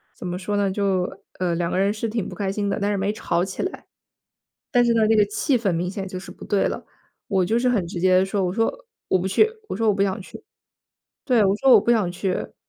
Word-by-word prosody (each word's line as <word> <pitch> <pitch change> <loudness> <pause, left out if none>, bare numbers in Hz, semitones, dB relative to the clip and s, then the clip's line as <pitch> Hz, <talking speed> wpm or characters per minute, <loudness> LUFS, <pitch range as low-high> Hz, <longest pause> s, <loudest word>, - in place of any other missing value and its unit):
怎 - - -9
么 180 0 -3
说 205 +2 -3
呢？ 200 -1 +1
就， 190 -2 -1 0.2
呃， 180 -2 0
两 170 0 -1
个 - - -1
人 195 +1 +2
是 220 +1 -3
挺 220 -2 -3
不 - - -8
开 200 -2 -2
心 200 +1 -2
的， 200 - -1
但 205 0 0
是 - - 0
没 195 +1 0
吵 175 -5 -1
起 190 +1 -4
来。 375 - -5 0.9
但 245 -1 +4
是 235 - +3
呢， 225 -1 +3
那 220 +1 +4
个 210 - +5
气 250 +6 0
氛 205 -6 0
明 175 +2 -1
显 195 0 -5
就 185 -1 -6
是 180 - -10
不 - - -11
对 200 - +1
了。 - - -5 0.4
我 195 -3 +2
就 220 +6 +1
是 250 +1 +2
很 205 -8 0
直 175 +1 -6
接 185 +1 +4
地 185 - +3
说， 195 0 -1
我 180 - -1
说： 225 +3 +1 0.4
“我 185 - +3
不 180 - -2
去。” 430 - +3 0.2
我 - - -3
说： 225 -1 +1
“我 210 - +4
不 195 - +1
想 200 +1 -1
去。” 190 - -12 0.8
对， 245 -5 +3
我 195 +1 +2
说：” 265 +4 +4
我 - - +8
不 - - 0
想 215 -7 +2
去。” 185 +1 -2
而 - - -3
且 - - -15
200 Hz, 300 characters per minute, -23 LUFS, 185-220 Hz, 0.9 s, 我